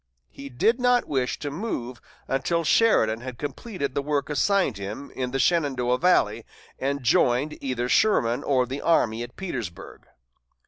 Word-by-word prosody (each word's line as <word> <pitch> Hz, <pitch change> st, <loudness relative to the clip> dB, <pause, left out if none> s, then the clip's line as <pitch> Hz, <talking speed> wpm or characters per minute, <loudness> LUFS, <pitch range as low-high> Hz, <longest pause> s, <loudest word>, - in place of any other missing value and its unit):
He 140 Hz, 0 st, -9 dB
did 225 Hz, -, +1 dB
not 245 Hz, 0 st, +3 dB
wish 130 Hz, -4 st, -1 dB
to 145 Hz, -, -5 dB
move 135 Hz, -, -5 dB, 0.3 s
until 165 Hz, +5 st, 0 dB
Sheridan 120 Hz, -, +3 dB
had 130 Hz, -1 st, -7 dB
completed 145 Hz, -, -5 dB
the -, -, -1 dB
work 145 Hz, 0 st, -2 dB
assigned 180 Hz, -, +1 dB
him 105 Hz, +8 st, -7 dB
in 130 Hz, -1 st, -3 dB
the 135 Hz, -, -2 dB
Shenandoah 130 Hz, -6 st, +1 dB
valley 180 Hz, +1 st, +2 dB, 0.4 s
and 140 Hz, 0 st, -2 dB
joined 125 Hz, +5 st, +2 dB
either 125 Hz, -2 st, -2 dB
Sherman 125 Hz, -, +2 dB
or 130 Hz, -3 st, +2 dB
the 135 Hz, +3 st, -5 dB
army 115 Hz, -9 st, +2 dB
at 120 Hz, 0 st, -7 dB
Petersburg. 120 Hz, -, -7 dB
135 Hz, 150 wpm, -25 LUFS, 125-165 Hz, 0.4 s, not